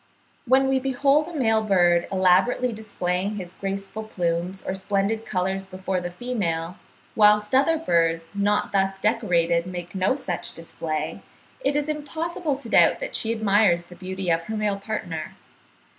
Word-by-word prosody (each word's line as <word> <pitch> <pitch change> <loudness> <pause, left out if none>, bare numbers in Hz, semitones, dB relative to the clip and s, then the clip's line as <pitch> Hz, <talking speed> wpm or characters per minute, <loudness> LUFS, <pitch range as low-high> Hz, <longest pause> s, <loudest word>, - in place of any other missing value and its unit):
When 265 +2 +4
we 265 0 +2
behold 275 +3 +2
a 345 - -8
male 225 -6 +2
bird 175 -4 +3
elaborately 195 +7 +3
displaying 200 -2 -2
his 180 -3 -6
graceful 195 +3 -5
plumes 180 -1 -2
or - - -2
splendid 200 +3 -1
colours 190 +1 -1
before 185 0 -3
the 175 - -4
female, 180 -5 -3 0.4
whilst 210 0 +4
other 280 +5 +4
birds, 165 - +1
not 205 +1 +1
thus 195 -1 +1
decorated, 180 -6 +1
make 175 -1 -6
no 190 +7 +1
such 225 -11 -2
display, 160 -2 -5 0.4
it - - 0
is 295 0 0
impossible 310 +1 -3
to 275 -4 -11
doubt - - +5
that - - -5
she 225 - +1
admires 205 -5 +3
the 175 +1 -14
beauty 190 -1 -3
of 165 0 0
her 220 +3 -4
male 210 -2 0
partner. 180 -6 -5
195 Hz, 155 wpm, -24 LUFS, 180-230 Hz, 0.4 s, doubt